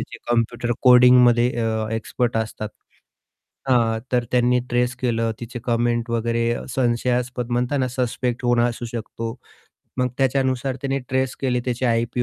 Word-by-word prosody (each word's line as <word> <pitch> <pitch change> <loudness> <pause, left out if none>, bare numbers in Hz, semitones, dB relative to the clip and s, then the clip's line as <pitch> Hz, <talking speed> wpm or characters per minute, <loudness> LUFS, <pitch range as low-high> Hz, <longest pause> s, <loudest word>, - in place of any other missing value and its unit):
जे - - -8
कॉम्प्युटर 120 0 0
कोडिंगमध्ये 125 -1 +6
अ, 110 -1 -1
एक्सपर्ट 115 +1 -1
असतात 110 -1 -3 1.0
हां, 115 -3 +2
तर 125 -1 +2
त्यांनी 125 0 +3
ट्रेस 120 0 +1
केलं. 115 -2 0
तिचे 120 +1 -6
कमेंट 120 0 0
वगैरे 115 0 0
अ, - - -5
संशयास्पद 125 0 -1
म्हणताना 125 +2 0
सस्पेक्ट 125 -1 -2
कोण 120 -1 +2
असू 120 0 -1
शकतो. 115 0 -5 0.6
मग 125 - +2
त्याच्यानुसार 130 0 0
त्याने 135 0 -1
ट्रेस 130 0 0
केले, 125 -2 0
त्याचे 125 +1 -2
आयपी 120 +1 0
120 Hz, 135 wpm, -22 LUFS, 115-125 Hz, 1.0 s, कोडिंगमध्ये